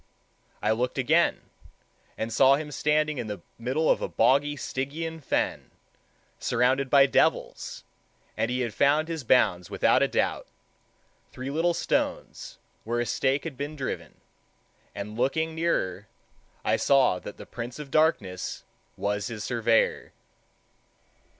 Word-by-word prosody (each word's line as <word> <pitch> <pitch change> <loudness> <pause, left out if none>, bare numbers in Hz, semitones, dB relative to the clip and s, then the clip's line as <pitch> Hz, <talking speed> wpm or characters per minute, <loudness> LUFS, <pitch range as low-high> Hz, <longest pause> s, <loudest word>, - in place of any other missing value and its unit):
I 105 - +2
looked 125 +3 -1
again, 160 +6 +2 0.8
and 110 0 -3
saw 135 +3 +6
him 150 +1 -5
standing 150 0 +1
in 120 - -4
the 105 -4 -6 0.2
middle 130 +7 0
of - - +3
a - - -1
boggy 145 +2 +2
Stygian 155 +5 -4
fen, - - -1 0.7
surrounded 130 +3 +1
by 140 0 +7
devils, 135 - 0 0.5
and 115 - 0
he 125 +1 -1
had 120 -4 -2
found 150 +6 +3
his 165 -4 -4
bounds 100 -8 +3
without - - +3
a - - +4
doubt, - - -1 0.8
three 130 +2 -6
little 165 +3 +1
stones, - - -2 0.3
where 120 +2 -2
a 120 - 0
stake 135 +4 0
had 165 -5 -6
been 145 +2 -4
driven, 90 - -5 0.8
and 105 +3 -6
looking 160 +5 0
nearer, 105 - -1 0.6
I - - +2
saw 130 -9 +3
that 105 - -9
the - - -10
Prince 120 0 -7
of 150 -2 -9
Darkness 105 - 0 0.3
was 105 +2 -1
his 115 -4 -6
surveyor. 115 -2 +1
130 Hz, 135 wpm, -27 LUFS, 115-150 Hz, 0.8 s, by